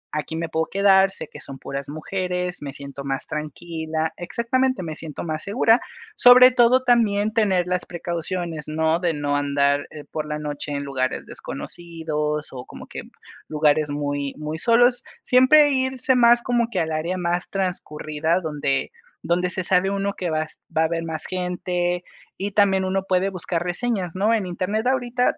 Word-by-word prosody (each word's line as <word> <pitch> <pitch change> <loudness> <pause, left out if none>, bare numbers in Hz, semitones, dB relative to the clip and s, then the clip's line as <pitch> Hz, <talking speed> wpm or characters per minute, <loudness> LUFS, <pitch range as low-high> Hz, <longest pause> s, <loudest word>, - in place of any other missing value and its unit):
aquí 150 +1 -3
me 165 +1 -2
puedo 160 0 -1
quedar, 195 -1 +4
sé 190 - -6
que - - -12
son 135 - -8
puras 140 +1 -6
mujeres, 180 +3 -3
me 145 -1 -5
siento 140 0 -7
más 135 -1 -3
tranquila". 160 +1 -4
Exactamente, 235 +5 0
me 160 -2 -5
siento 155 -2 -6
más 155 -2 -3
segura. 225 +3 +3 0.3
Sobre 250 +1 +8
todo, 250 +1 +5
también 220 -4 +2
tener 195 -6 +2
las 180 0 -1
precauciones, 170 -2 -4
¿no?, 160 +1 +1
de 175 -3 0
no 145 -1 -1
andar 140 0 +1 0.2
por 155 -1 -3
la 150 0 -3
noche 150 -1 -4
en 140 0 -2
lugares 130 -2 -2
desconocidos 155 -3 -4
o 125 -2 -7
como - - -11
que - - -7 0.5
lugares 150 0 +2
muy 145 -1 -3
muy 155 +1 -5
solos. 245 +3 +4 0.2
Siempre 290 +4 +6
irse 260 -1 +1
más 240 -1 +5
como 240 -2 +1
que 200 -6 -2
al 160 -1 -1
área 165 +4 -2
más 175 0 -1
transcurrida, 165 -3 -1
donde 150 - -1 0.3
donde 180 +1 +1
se 185 +1 -2
sabe 185 +1 +2
uno 200 0 -1
que 180 -3 -3
va 155 0 0 0.3
va 160 - +3
a - - +3
haber 165 +1 -2
más 160 -1 -5
gente, 180 -1 -2 0.3
y 200 +2 -3
también 195 -2 +3
uno 190 +1 0
puede 185 +1 +2
buscar 175 -2 -3
reseñas, 180 -1 -2
¿no?, 205 +4 +2
en 215 -4 +1
Internet 185 +5 -2
ahorita 250 -1 +1
175 Hz, 170 wpm, -23 LUFS, 155-200 Hz, 0.5 s, Sobre